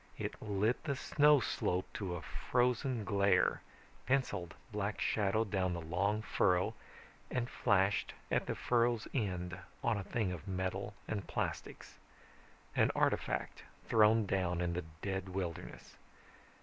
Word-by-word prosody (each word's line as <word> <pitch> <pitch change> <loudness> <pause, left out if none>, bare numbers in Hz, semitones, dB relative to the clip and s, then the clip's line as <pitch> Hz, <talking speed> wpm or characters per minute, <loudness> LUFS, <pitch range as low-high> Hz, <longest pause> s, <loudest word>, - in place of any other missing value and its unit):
It - - -4
lit 105 +3 0
the 140 -3 0
snow 150 +2 +5
slope 90 -4 0
to 95 -4 -3
a 85 - -6
frozen 125 -2 0
glare, 100 -3 +3 0.5
penciled 125 -10 0 0.2
black 105 0 -2
shadow 110 +1 +2
down 95 -4 0
the 85 - -3
long 95 +6 0
furrow, 95 +1 +2 0.6
and 125 -1 -1
flashed 100 -3 +2 0.2
at - - +1
the - - -1
furrow's 120 -2 +1
end 95 -6 -2 0.2
on 110 -3 +2
a - - -4
thing 105 -2 -1
of 90 +1 -7
metal 95 +2 -2
and 100 -4 -3
plastics, - - -4 0.8
an - - +4
artifact - - 0 0.3
thrown 110 0 +5
down 90 -3 0
in 85 -1 0
the 90 -1 -3 0.2
dead 95 -1 -2
wilderness. 90 -3 -5
100 Hz, 135 wpm, -35 LUFS, 90-110 Hz, 0.8 s, snow